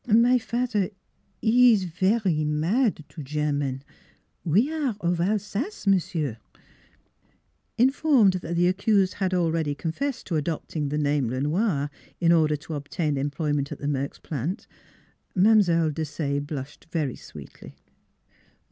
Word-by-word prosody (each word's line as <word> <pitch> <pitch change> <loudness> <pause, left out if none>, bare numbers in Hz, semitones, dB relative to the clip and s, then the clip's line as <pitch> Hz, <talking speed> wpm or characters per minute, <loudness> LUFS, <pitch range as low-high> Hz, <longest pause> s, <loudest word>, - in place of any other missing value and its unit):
My 240 +3 +5
fat'er, 230 -3 -1
'e - - -9 0.5
ees 230 -3 +5
vary 185 -1 +1
mad 160 - +1
to 160 - -9
German: 145 -2 -2 0.6
we 215 - +2
are 285 -8 -1
of 175 -2 0
Alsace, 210 - -2
340 190 -3 +1
NEIGHBORS 130 -7 -3 1.4
Informed 260 -4 +4
that 170 0 -4
the 175 +1 +3
accused 195 0 +2
had 185 -2 -1
already 165 -4 0
con 160 +2 -3
fessed 275 - -3
to 165 - -1
adopting 150 -1 -3
the 150 - -2
name 145 -3 +1
Le 130 +2 -2
Noir 150 -2 0 0.3
in 170 -1 +3
order 155 -3 +4
to 150 +2 -8
obtain 150 +1 -2
employment 145 0 -1
at - - -5
the 145 - -5
Merks 140 -1 -2
plant, 155 - -4 0.7
Mile. 180 -5 +4
Desaye 145 -2 -2
blushed 145 +1 -7
very 155 -6 -2
sweetly. 75 -3 -12
170 Hz, 135 wpm, -25 LUFS, 150-205 Hz, 1.4 s, My